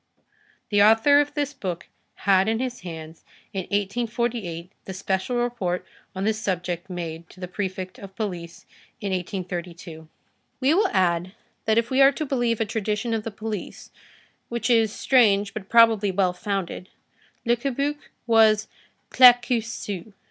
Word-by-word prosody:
The 205 -1 +4
author 225 +8 +6
of 290 - -4
this 290 -1 -1
book 185 - -5 0.4
had 195 +1 +4
in 225 - +1
his 250 0 -3
hands, 160 -2 -9 0.3
in 190 -2 -3
1848, 205 -4 -2
the 190 - -6
special 190 +5 -2
report 235 -7 -1 0.3
on 190 - -3
this 220 +1 0
subject 180 -2 -3
made 170 -2 -6
to - - -16
the 180 - -5
Prefect 185 0 -5
of 195 -1 -11
Police 175 -6 -5 0.3
in 200 - -3
1832. 175 -3 -5 0.5
We 270 +3 +3
will 395 +3 +3
add, 180 - +1 0.3
that 220 0 +2
if 230 +2 +1
we 265 +1 +3
are 270 0 +8
to 310 - -3
believe 240 -5 0
a 225 - +1
tradition 220 +1 -2
of 225 - 0
the 225 - -4
police, 215 -2 -6 0.6
which 235 +1 -1
is 225 -2 +4
strange 205 -6 +3
but 205 -3 -7
probably 225 -3 +5
well 185 -1 +1
founded, 190 -1 -4 0.6
Le 235 +1 +3
Cabuc 275 +4 -2 0.3
was 220 -2 +4 0.4
Claquesous. 235 -5 +3
210 Hz, 150 wpm, -24 LUFS, 185-235 Hz, 0.6 s, are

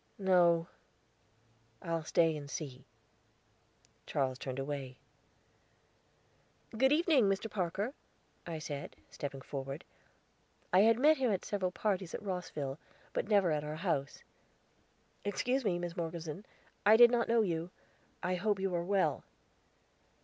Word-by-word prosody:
"No; 175 -4 +4 1.1
I'll 165 -1 -2
stay 165 0 +3
and 145 -1 -7
see." 135 -3 -6 1.2
Charles 130 -2 -1
turned 130 -1 -5
away. 135 -2 -4 1.8
"Good 265 +4 +4
evening, 300 - +4
Mr. 195 +2 -1
Parker," 195 +5 -2 0.5
I 165 -2 -3
said, 145 -2 -6 0.2
stepping 140 -1 -5
forward. 135 +2 -6 0.9
I 185 - +7
had 225 +3 +6
met 305 +5 +5
him 255 -4 +1
at 195 - -1
several 195 -3 -1
parties 190 -3 -1
at - - -6
Rosville, 160 -7 -4 0.3
but - - -1
never 200 -5 +4
at 150 -1 0
our 150 +1 -4
house. 155 -5 -2 1.0
"Excuse 250 +6 0
me, 190 -5 +1
Miss 175 -1 -4
Morgeson; 170 +1 -5 0.4
I 215 +2 +7
did 240 0 +9
not 240 -1 +2
know 230 -1 +4
you. 170 -3 -2 0.5
I 180 - 0
hope 205 +1 0
you 190 -1 -1
are 170 -1 0
well." 195 +1 +1
180 Hz, 130 wpm, -33 LUFS, 150-205 Hz, 1.8 s, did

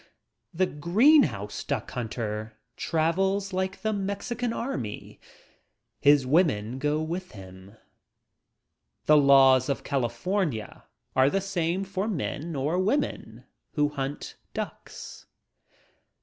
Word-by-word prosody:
The 185 +1 +1
green 205 - +5
house 105 -5 -3
duck - - -3
hunter 110 -2 -4 0.2
travels 190 +5 0
like 190 +2 -2
the 220 0 +1
Mexican 210 +4 -2
army. 130 - -5 0.8
His 145 -2 +5
women 130 - +1
go 150 +2 0
with 180 +3 -5
him. 95 +1 -12 1.3
The 150 - +6
laws 135 -2 +6
of 140 - -1
California 135 - -2 0.3
are 130 +1 +5
the 195 - +1
same 185 -1 -1
for 195 +1 -3
men 165 -4 -3
or 150 +6 0
women 225 +10 -1 0.3
who 150 -2 +2
hunt 140 -1 -5 0.2
ducks. - - -7
155 Hz, 105 wpm, -27 LUFS, 130-190 Hz, 1.3 s, The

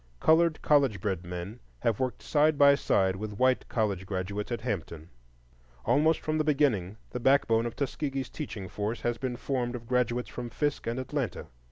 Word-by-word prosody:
Colored 160 0 +4
college 135 -9 +3
bred 95 -2 -2
men 90 +6 -6 0.2
have 115 -3 +1
worked 130 -1 -2
side 150 0 +3
by 140 0 +7
side 95 -8 +2
with 105 0 -6
white 130 +1 +2
college 100 -5 -1
graduates 100 +3 -3
at 120 - -2
Hampton; 85 -8 -4 0.7
almost 160 +2 +3
from 155 0 -1
the - - +3
beginning 130 - +1
the 125 - -3
backbone 120 -3 +3
of 115 - -7
Tuskegee's 135 -2 -3
teaching 105 -11 -6
force 105 +4 -3
has 120 -1 -1
been 130 -2 -2
formed 125 -1 -2
of 120 -1 -7
graduates 125 0 0
from 120 -1 -6
Fisk 145 +2 -2
and 115 +2 -1
Atlanta. 130 -1 -3
120 Hz, 175 wpm, -29 LUFS, 105-140 Hz, 0.7 s, by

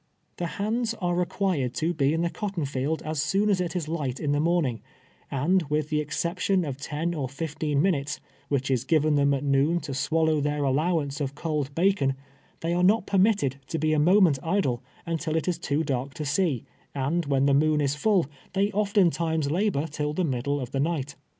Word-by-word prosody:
The 175 - -2
hands 225 +3 -1
are 175 -4 -1
required 175 -7 0
to 165 +2 0
be 140 -3 +2
in 165 +2 0
the 170 - 0
cotton 195 -7 -3
field 140 +3 -2
as 155 -1 -2
soon 205 +6 +2
as 185 -2 +2
it 180 0 -3
is 170 -4 -2
light 145 -6 -3
in 145 - -1
the 145 - +2
morning, 155 - +1 0.5
and, 160 +7 +2
with 150 0 0
the 150 -1 +1
ex 150 0 -4
ception 180 0 0
of 135 -2 -4
ten 155 +4 -3
or 140 -6 -3
fifteen 150 0 -1
minutes, 150 -6 0 0.3
which 135 -1 0
is 125 -2 +1
given 155 +2 +2
them 140 -1 +3
at 140 0 0
noon 145 +4 +2
to 140 - -5
swallow 160 +2 +1
their 150 0 0
allowance 145 +1 0
of 140 0 -3
cold 150 -3 -2
bacon, 170 -7 +2 0.5
they 165 +1 -1
are 175 - +1
not 200 +3 +4
permitted 195 - +2
to 165 - -2
be 155 0 +1
a 155 - +2
moment 175 -3 +5
idle 160 -9 0 0.2
until 165 -1 -2
it 160 - -1
is 175 -2 0
too 155 -2 0
dark 135 -2 -3
to 150 - -4
see, 150 - 0 0.3
and 145 +4 -1
when 135 -1 +2
the 140 - +4
moon 155 +2 +3
is 140 -2 +1
full, 185 +3 +2 0.3
they 200 +2 +1
often 200 -3 +3
times 160 -2 -1
labor 180 -4 +1
till 150 -1 -3
the 185 - 0
middle 140 -1 -1
of 125 -3 -5
the 135 - -1
night. 145 -2 -1
155 Hz, 205 wpm, -26 LUFS, 140-175 Hz, 0.5 s, moment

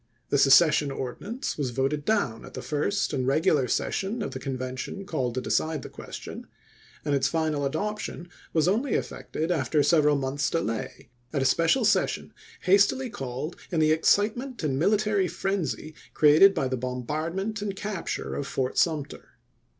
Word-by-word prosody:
The 140 - +2
secession 145 +1 +6
ordinance 155 - -5
was 135 -3 0
voted 135 +4 -1
down 165 - 0
at - - -11
the - - -6
first 155 +7 -1
and 130 -2 -1
regular 140 -1 +2
session 205 - -1
of - - -4
the 130 - -6
Convention 130 +7 -5
called 125 -11 -2
to 130 - -1
decide 155 +3 0
the - - -8
question; - - -9 0.6
and 145 - 0
its 140 -1 +2
final 155 -1 0
adoption 210 +1 -4 0.2
was 160 0 +2
only 235 +8 +1
effected 160 +3 -3
after 150 -2 +1
some 150 -3 +4
months' 135 +2 -1
delay, 115 -10 -3 0.2
at 140 -3 0
a - - -1
special 165 - +3
session - - +1 0.3
hastily 200 +7 +3
called 135 - -5
in 170 - 0
the 155 0 +4
excitement 215 +8 +1
and 135 -3 0
military 205 +1 +2
frenzy 180 -5 -3 0.2
created 155 +7 +7
by 135 - 0
the 130 0 -2
bom 125 0 -4
bardment 180 - -3
and 200 -2 -3
capture 200 -2 -4
of 140 - -3
Fort 130 -1 -1
Sumter. 155 -4 -2
155 Hz, 160 wpm, -26 LUFS, 135-195 Hz, 0.6 s, created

